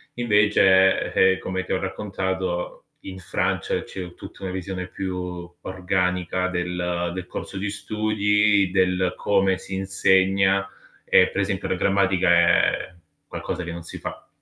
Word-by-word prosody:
Invece, 105 -4 +4
eh, 95 0 +4
come 95 0 -3
ti - - -3
ho 95 - 0
raccontato, 95 -2 -3 0.2
in 95 -1 -7
Francia 90 - -1
c'è 90 -2 -8
tutta - - -12
una 95 - -3
visione 95 0 -4
più 90 -2 -5
organica 90 -1 -1
del 90 -1 -2
del 90 - -5
corso 95 - -7
di 100 +1 -2
studi, 105 -1 +1
del 95 -1 +1
come 95 -2 +2
si 95 - -9
insegna 95 0 +2 0.4
e 90 - +5
per 100 - -2
esempio 95 -1 -2
la - - 0
grammatica 95 -1 +2
è 85 +1 +3 0.3
qualcosa 90 - -5
che 85 - -6
non 85 0 -7
si - - -9
fa. - - -8
95 Hz, 140 wpm, -23 LUFS, 90-95 Hz, 0.4 s, e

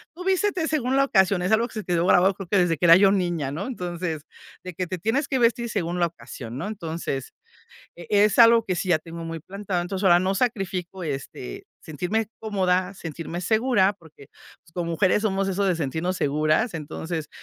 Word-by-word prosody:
"Tú 360 - -8
vístete 380 -2 +1
según 265 -4 0
la 275 - +4
ocasión", 190 -6 +3
es 180 +3 -1
algo 225 +2 +3
que - - -17
se 210 - -5
quedó 175 -1 +1
grabado, 185 +1 +4
creo 195 -3 -8
que 205 - +3
desde 170 -2 +2
que 175 - 0
era 165 0 +9
yo 195 0 +5
niña, 175 -8 -1
¿no? 160 +7 -4
Entonces 175 - -4 0.4
de 185 -1 -7
que 180 - -2
te 185 -1 -4
tienes 255 - 0
que 265 - 0
vestir 235 0 +2
según 180 -4 -2
la 175 - +4
ocasión, 120 -7 -10
¿no? 185 - -3
Entonces 165 -9 -5 0.6
e 175 - -10 0.2
es 210 - +1
algo 230 0 +7
que 185 -4 -1
sí 185 - -3
ya 160 - +4
tengo 165 +1 -9
muy 165 0 -5
plantado. 195 +1 -4
Entonces 190 +2 -4
ahora 175 -2 +6
no 190 +1 0
sacrifico 190 -5 -2
este 135 - -6 0.2
sentirme 180 +8 -2
cómoda, 185 -3 0
sentirme 165 0 -6
segura, 220 -1 +3
porque, 160 -7 -18 0.4
pues, 160 - -23
como 170 -1 -3
mujeres 185 +4 +2
somos 195 -2 0
eso 195 +1 0
de 185 -3 +1
sentirnos 160 +4 -2
seguras. 155 - +1
Entonces 160 0 -5
185 Hz, 205 wpm, -24 LUFS, 165-210 Hz, 0.6 s, era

